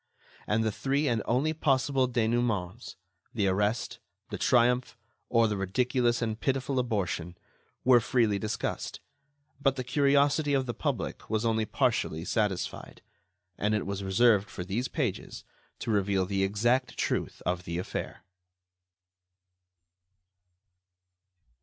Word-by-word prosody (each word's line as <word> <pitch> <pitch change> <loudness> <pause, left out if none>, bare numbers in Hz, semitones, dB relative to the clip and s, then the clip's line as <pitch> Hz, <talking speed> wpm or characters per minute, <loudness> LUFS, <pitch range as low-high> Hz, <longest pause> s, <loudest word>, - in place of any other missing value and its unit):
And 110 +2 +1
the 110 - +1
three 140 +7 0
and 115 -4 +1
only 135 +7 +1
possible 135 -3 +1
dénouements—the 110 -3 -2
arrest, 105 +4 0 0.3
the - - -3
triumph, 125 +1 +2 0.3
or 115 -1 +4
the 105 -1 -2
ridiculous 120 +5 +1
and 110 -1 -2
pitiful 135 0 0
abortion—were 105 +2 -1
freely 110 -4 +1
discussed; 105 +1 -3 0.6
but 135 -1 +2
the 130 - -3
curiosity 145 +2 +2
of 135 -1 +1
the 120 - -3
public - - -3
was 110 +1 0
only 110 -1 +1
partially 80 -4 0
satisfied, 105 -5 -2 0.6
and 105 +1 +1
it 105 - -1
was 100 0 -4
reserved 100 +1 +3
for 90 - -6
these 110 +7 -2
pages 125 - -3 0.3
to 115 - -3
reveal 100 -2 +1
the 95 0 0
exact 120 +6 +1
truth - - -2
of 90 0 -1
the 85 +1 -3
affair. 90 - -5
115 Hz, 120 wpm, -29 LUFS, 100-125 Hz, 0.6 s, or